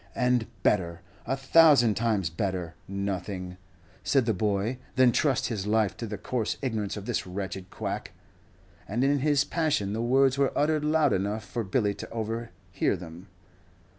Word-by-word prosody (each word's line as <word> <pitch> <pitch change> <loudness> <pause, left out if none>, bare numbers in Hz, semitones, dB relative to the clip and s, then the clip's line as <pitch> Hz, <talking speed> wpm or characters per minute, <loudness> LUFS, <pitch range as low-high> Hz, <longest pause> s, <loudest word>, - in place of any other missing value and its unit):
"And 125 -2 +2 0.2
better, 85 -4 +1 0.3
a 135 +3 0
thousand 135 -5 +6
times 105 -6 0
better, 90 -1 -3
nothing," 95 -2 -4 0.5
said 135 -4 +2
the 115 - +2
boy, 105 +5 -1 0.2
"than 130 -2 +5
trust 135 +2 +1
his 105 -4 -3
life 105 -3 +2
to 115 - -5
the 105 0 -5
coarse 110 +2 -2
ignorance 110 -6 -2
of 100 - -7
this - - -2
wretched 95 0 -5
quack." - - -4 0.8
And 120 +6 -1
in 140 +1 +3
his 145 0 +3
passion 150 - 0
the 110 - -2
words 135 +2 +3
were 140 - +2
uttered 150 0 +2
loud 155 0 +3
enough 100 +2 -1
for 115 +5 -3
Billy 105 +1 0
to - - -8
overhear 110 -5 -3
them. 85 +2 -10
110 Hz, 160 wpm, -27 LUFS, 95-130 Hz, 0.8 s, thousand